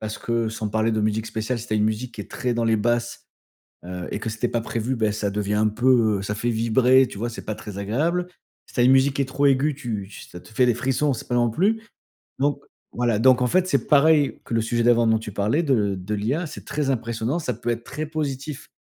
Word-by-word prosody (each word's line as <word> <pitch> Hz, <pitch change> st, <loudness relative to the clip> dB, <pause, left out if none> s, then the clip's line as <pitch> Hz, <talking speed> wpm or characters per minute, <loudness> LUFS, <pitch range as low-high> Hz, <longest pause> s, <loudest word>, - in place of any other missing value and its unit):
Parce 110 Hz, 0 st, -5 dB
que 115 Hz, -1 st, -1 dB
sans 110 Hz, -1 st, -4 dB
parler 110 Hz, +2 st, +1 dB
de 110 Hz, -, 0 dB
musique 110 Hz, +1 st, 0 dB
spéciale, 115 Hz, +3 st, -3 dB
si 115 Hz, -, -8 dB
tu 110 Hz, -, -5 dB
as -, -, +3 dB
une 105 Hz, -, +2 dB
musique 110 Hz, +3 st, -2 dB
qui 105 Hz, -, -7 dB
est -, -, -9 dB
très 125 Hz, -1 st, -2 dB
dans 115 Hz, 0 st, 0 dB
les 110 Hz, -1 st, +3 dB
basses, 120 Hz, +2 st, -1 dB, 0.6 s
heu 90 Hz, 0 st, -6 dB
et -, -, -3 dB
que 115 Hz, -, -4 dB
c'était 110 Hz, +3 st, -2 dB
pas 115 Hz, -1 st, -1 dB
prévu, 120 Hz, +2 st, -2 dB
bah 110 Hz, -2 st, +1 dB
ça 105 Hz, -1 st, -2 dB
devient 105 Hz, +1 st, -2 dB
un 110 Hz, 0 st, +3 dB
peu, 115 Hz, -2 st, +3 dB
heu, -, -, -5 dB
ça 105 Hz, +1 st, -3 dB
fait 120 Hz, +3 st, -1 dB
vibrer, 125 Hz, +3 st, +4 dB
tu -, -, -10 dB
vois? 120 Hz, +3 st, -2 dB
C'est 115 Hz, -, -9 dB
pas 110 Hz, -, -3 dB
très 100 Hz, -2 st, -9 dB
agréable. 160 Hz, -, -1 dB, 0.4 s
Si -, -, -18 dB
tu -, -, -2 dB
as -, -, +5 dB
une 130 Hz, -, +6 dB
musique 135 Hz, +1 st, +3 dB
qui 140 Hz, -, +1 dB
est -, -, -3 dB
trop 135 Hz, +2 st, -1 dB
aiguë, 140 Hz, +2 st, +2 dB
tu 110 Hz, -8 st, -5 dB
tu -, -, -12 dB
ça 90 Hz, -, -10 dB
te -, -, -17 dB
fait 125 Hz, +3 st, +2 dB
des 120 Hz, -, +3 dB
frissons, 135 Hz, +4 st, 0 dB
c'est 115 Hz, -, -7 dB
pas 120 Hz, -, -1 dB
non 120 Hz, -1 st, +3 dB
plus 205 Hz, -, +1 dB, 0.6 s
donc, 140 Hz, 0 st, 0 dB, 0.3 s
voilà, 120 Hz, -3 st, +1 dB
donc, 130 Hz, +1 st, +5 dB
en 125 Hz, -, +3 dB
fait, 185 Hz, +6 st, +2 dB
c'est -, -, 0 dB
pareil 150 Hz, 0 st, +4 dB
que -, -, -6 dB
le 115 Hz, -, +2 dB
sujet 120 Hz, +1 st, -1 dB
d'avant 120 Hz, -1 st, +4 dB
dont 110 Hz, 0 st, +3 dB
tu 105 Hz, -2 st, -7 dB
parlais 110 Hz, +11 st, +1 dB
de 110 Hz, -, +1 dB
de 95 Hz, +3 st, -4 dB
l'IA. 135 Hz, -, -1 dB
C'est -, -, -9 dB
très 150 Hz, -2 st, -2 dB
impressionnant, 115 Hz, +3 st, -1 dB
ça 125 Hz, -6 st, -2 dB
peut 120 Hz, +2 st, -5 dB
être 120 Hz, 0 st, -2 dB
très 155 Hz, +5 st, -5 dB
positif 145 Hz, -2 st, -4 dB
120 Hz, 270 wpm, -23 LUFS, 110-135 Hz, 0.6 s, une